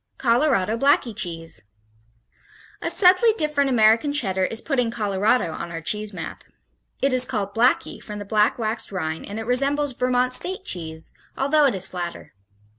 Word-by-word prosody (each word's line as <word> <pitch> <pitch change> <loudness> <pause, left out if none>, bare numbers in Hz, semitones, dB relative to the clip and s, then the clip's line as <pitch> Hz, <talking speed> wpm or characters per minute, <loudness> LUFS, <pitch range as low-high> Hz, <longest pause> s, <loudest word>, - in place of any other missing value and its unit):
Colorado 230 -4 +1
Blackie 275 -4 +2
Cheese 165 - -4 1.2
A - - -1
subtly 385 +4 +5
different 300 -3 +1
American 230 +3 +4
Cheddar 190 -10 0
is 225 +4 -1
putting 250 -5 0
Colorado 210 -3 0
on 170 - -6
our 165 - -5
cheese 210 +5 -2
map. 180 -5 -7 0.6
It 275 -1 +3
is 255 -1 +3
called 205 -5 -3
Blackie 240 +4 +1
from 210 -1 -7
the 205 - -7
black 210 +1 +2
waxed 220 -1 -3
rind 160 -4 -4
and 205 - -6
it 225 - -5
resembles 275 +3 +1
Vermont 250 0 +1
State 375 +7 0
cheese, 160 -2 -5 0.2
although 290 +2 +3
it 265 - +2
is 190 0 -1
flatter. 175 -2 -6
225 Hz, 160 wpm, -23 LUFS, 195-270 Hz, 1.2 s, subtly